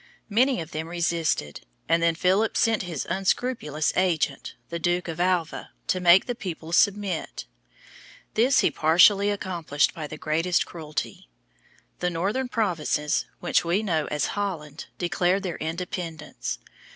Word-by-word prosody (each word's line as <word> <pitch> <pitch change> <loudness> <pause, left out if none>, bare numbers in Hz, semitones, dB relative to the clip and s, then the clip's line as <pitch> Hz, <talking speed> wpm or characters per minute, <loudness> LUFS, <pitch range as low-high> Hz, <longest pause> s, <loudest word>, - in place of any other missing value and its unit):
Many 250 +5 +3
of 160 - -8
them 160 +1 -4
resisted, 165 - -1 0.3
and 165 +1 +3
then 165 -1 +3
Philip 190 +6 +2
sent 225 -1 +2
his 175 -7 -4
unscrupulous 190 - 0
agent, 165 -6 0
the 170 - -4
Duke 175 +2 0
of 165 0 -5
Alva, 175 -2 -1
to 185 - 0
make 180 +1 +6
the 245 - -2
people 170 -7 -6
submit. 195 -1 +1 0.9
This 250 +5 +4
he - - +2
partially 185 +6 +5
accomplished 175 -7 0
by 155 -4 -6
the 155 - -8
greatest 165 +4 +1
cruelty. 155 - -6 0.7
The 180 - 0
northern 200 +10 -1
provinces, 165 -9 0
which 175 - +2
we 175 +5 +1
know 160 -7 0
as 150 -2 -1
Holland, 170 -7 -4
declared 180 +2 +1
their 180 -3 -3
independence. 165 -1 -4
175 Hz, 140 wpm, -25 LUFS, 160-195 Hz, 0.9 s, make